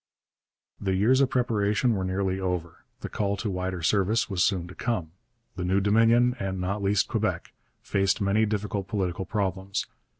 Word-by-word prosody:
The 95 -2 0
years 120 +8 +4
of 135 - +3
preparation 115 -1 +1
were 95 -3 -1
nearly 95 0 -1
over. 90 -3 -4 0.2
The - - -4
call 100 -1 -1
to 105 0 -2
wider 90 -2 -3
service 100 +6 +2
was 90 -2 +2
soon 90 -4 +1
to - - -9
come. 95 -10 -2 0.4
The 90 - -4
new 95 +2 +2
Dominion, 115 +4 +4
and 95 -1 -3
not 100 +3 -2
least 100 0 +2
Quebec, - - -2 0.3
faced 95 +1 +1
many 105 +2 +2
difficult 105 -2 -2
political 95 -3 -2
problems. 95 -1 -2
100 Hz, 165 wpm, -27 LUFS, 95-105 Hz, 0.4 s, years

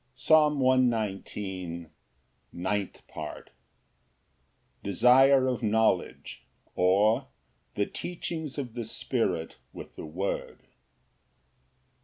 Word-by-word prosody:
Psalm 150 +3 +4
119:09. 100 - -1 0.6
Ninth 95 +2 -3
Part. - - -8 1.3
Desire 130 +7 +5
of 125 -1 -1
knowledge; 110 -4 0 0.3
or, 100 +5 +3 0.5
The 100 - +1
teachings 160 - -5
of 125 -5 -4
the 120 - -4
Spirit 100 -7 -2 0.2
with - - -10
the - - -8
word. 90 +6 -4
110 Hz, 80 wpm, -28 LUFS, 95-130 Hz, 1.3 s, Desire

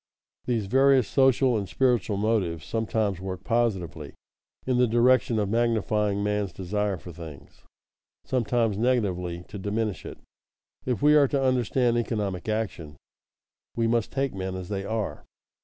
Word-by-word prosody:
_ - - -39
These 115 -4 0
various 135 +1 +4
social 130 -2 +3
and 100 -3 -2
spiritual 120 -6 +1
motives 100 -7 0
sometimes 110 -4 -1
work 95 -1 -6
positively, 95 - -1 0.5
in 125 -1 +1
the 125 - +4
direction 120 0 +3
of 105 -2 +1
magnifying 105 -2 0
man's 105 -1 -1
desire 100 +1 -2
for 90 - -10
things; 80 -3 -11 0.6
sometimes 115 -4 0
negatively, 90 -8 0
to 105 - -8
diminish 105 +1 -2
it. - - -8 0.7
If 125 +2 -1
we 150 +1 +6
are 145 -2 +6
to 135 0 0
understand 125 -1 +2
economic 105 -5 -3
action, 95 -9 -3 0.8
we 115 - +1
must 115 -1 0
take 135 -1 -1
men 95 -1 -4
as 95 -1 -7
they 100 -1 -3
are. 110 0 -3
110 Hz, 145 wpm, -26 LUFS, 95-120 Hz, 0.8 s, we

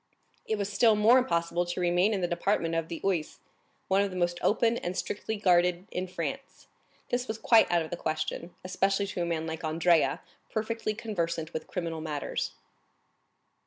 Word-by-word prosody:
It 220 - 0
was 200 0 -3
still 220 +1 +5
more 225 +5 +6
impossible 170 -7 0
to 175 +1 -4
remain 180 +3 +3
in 200 -3 -1
the 175 - +1
department 175 -1 0
of 165 -1 -1
the 165 - -6
Oise, 175 -6 -1 0.5
one 195 +1 +3
of 200 - 0
the 185 - -6
most 175 -1 0
open 230 +2 +2
and 180 -3 -4
strictly 220 +2 -3
guarded 180 -2 +3
in 185 +1 -3
France; 230 +10 -5 0.4
this 245 +1 -1
was 220 - -3
quite 225 0 +5
out 170 -1 +3
of 160 - -9
the 175 - -3
question, 155 +2 -3
especially 195 +2 +1
to 195 -3 -4
a 170 - 0
man 165 -1 -1
like 160 0 -5
Andrea, 160 +1 +2 0.3
perfectly 220 0 -2
conversant 170 -8 -3
with 160 - -5
criminal 165 -3 -4
matters. 150 -3 -3
180 Hz, 180 wpm, -29 LUFS, 170-210 Hz, 0.5 s, more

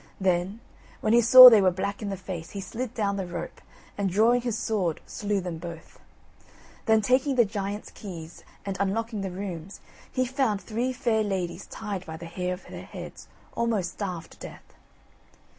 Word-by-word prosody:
Then, 190 +3 0 0.4
when 215 - +2
he 240 - +6
saw 255 +2 +12
they 225 -4 +8
were 190 - +5
black 195 +3 -3
in 205 - -3
the 195 - -4
face, 180 -3 -7
he 200 - -7
slid 235 +5 -5
down 200 -3 0
the 190 -2 -3
rope, 175 - -7 0.3
and 200 -1 -1
drawing 225 +6 +3
his 235 -2 -2
sword, 190 -9 -1
slew 205 -1 -2
them 175 -3 -5
both. 170 -1 -10 0.9
Then, 220 -1 +5
taking 260 +4 +2
the 240 -2 +5
giant's 205 0 -5
keys, 170 -5 -9 0.2
and 195 -1 -3
unlocking 215 +2 -1
the 195 - -3
rooms, 185 -1 -6 0.3
he 255 - 0
found 255 -5 0
three 235 +5 -2
fair 235 -3 0
ladies 185 -3 -3
tied 200 -4 -5
by 160 0 -6
the 170 - -9
hair 180 +2 -3
of 180 - -17
their - - -9
heads, - - -10 0.3
almost 220 -7 0
starved 180 -5 -5
to - - -17
death. - - -11
200 Hz, 180 wpm, -26 LUFS, 180-225 Hz, 0.9 s, saw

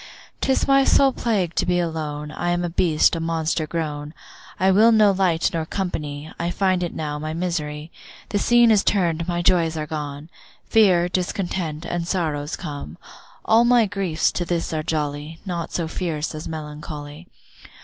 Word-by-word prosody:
'Tis 265 - +1
my 275 0 +5
sole 275 0 +4
plague 200 -10 -1
to - - +1
be 180 0 +1
alone, 150 -3 -3
I 175 - -2
am 175 0 0
a 170 - -4
beast, 165 -1 +3
a - - -2
monster 160 -1 -1
grown, 150 -2 -4 0.4
I 190 +1 +4
will 215 +4 +6
no 215 -2 +5
light 185 -4 +1
nor 165 -1 -1
company, 155 -4 -4
I 170 +1 -1
find 185 0 +1
it 175 - -3
now 150 -2 -3
my 155 +1 -4
misery. 160 -3 -3 0.4
The 205 - 0
scene 240 +1 +5
is 210 -2 +4
turn'd, 170 -4 +1
my 175 -1 -1
joys 170 -3 +2
are 155 - -2
gone, 150 +1 -6 0.3
Fear, 185 -6 +4
discontent, 175 -3 -2
and 170 -1 -3
sorrows 155 -6 -1
come. 145 - -7 0.5
All 225 +1 +5
my 240 -1 +5
griefs 190 -6 0
to 175 - -2
this 170 -1 -2
are 155 - -1
jolly, 150 0 -3
Naught 175 -3 -4
so 170 -2 -2
fierce 160 -3 -3
as 155 0 -6
melancholy. 150 0 -7
165 Hz, 170 wpm, -22 LUFS, 155-185 Hz, 0.5 s, will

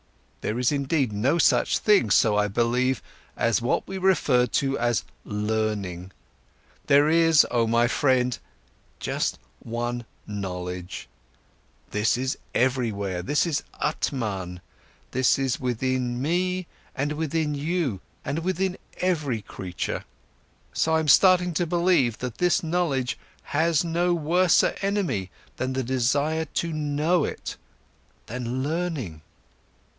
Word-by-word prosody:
There 110 - -2
is 125 +2 +2
indeed 140 -4 0
no 130 +11 +2
such - - +3
thing, 200 - +3
so 105 +1 +4
I 105 0 +2
believe, 120 +5 +1 0.3
as 115 -2 +2
what 120 - 0
we 190 0 -5
refer 150 -10 +3
to 135 +1 0
as 120 -3 +1 0.2
'learning'. 105 -4 -2 0.8
There 145 +1 +5
is, 165 -1 +5
oh 115 -2 +2
my 115 +1 +3
friend, 125 -1 +2 0.6
just - - -1 0.2
one 120 +1 -3 0.2
knowledge, 90 -3 -5 0.8
this 105 +4 +1
is 130 +1 -2 0.2
everywhere, 110 -8 0
this 145 - +1
is 165 -5 0 0.2
Atman, 95 -9 -2 0.5
this 130 0 +3
is 135 -2 -1
within 125 0 -1
me 180 +5 0 0.3
and 140 +2 -1
within 155 0 -1
you 145 - -1 0.2
and 150 - -1
within 185 +2 -1 0.2
every 150 - 0
creature. 90 -3 -4
And - - -12 0.7
so 160 0 +2
I'm 160 -1 +1
starting 180 +3 +5
to 170 +2 0
believe 170 -9 +2
that 125 -3 -6
this 180 -1 +2
knowledge 160 -7 0 0.2
has 160 +1 +1
no 175 +1 +1
worser 175 +3 +3
enemy 195 - -1 0.3
than 130 0 -2
the 130 0 -1
desire 140 +6 +1
to 165 +2 -3
know 155 +3 +1
it, - - -5 0.7
than 125 +2 -3
learning." 150 - -3
130 Hz, 125 wpm, -25 LUFS, 115-165 Hz, 0.8 s, There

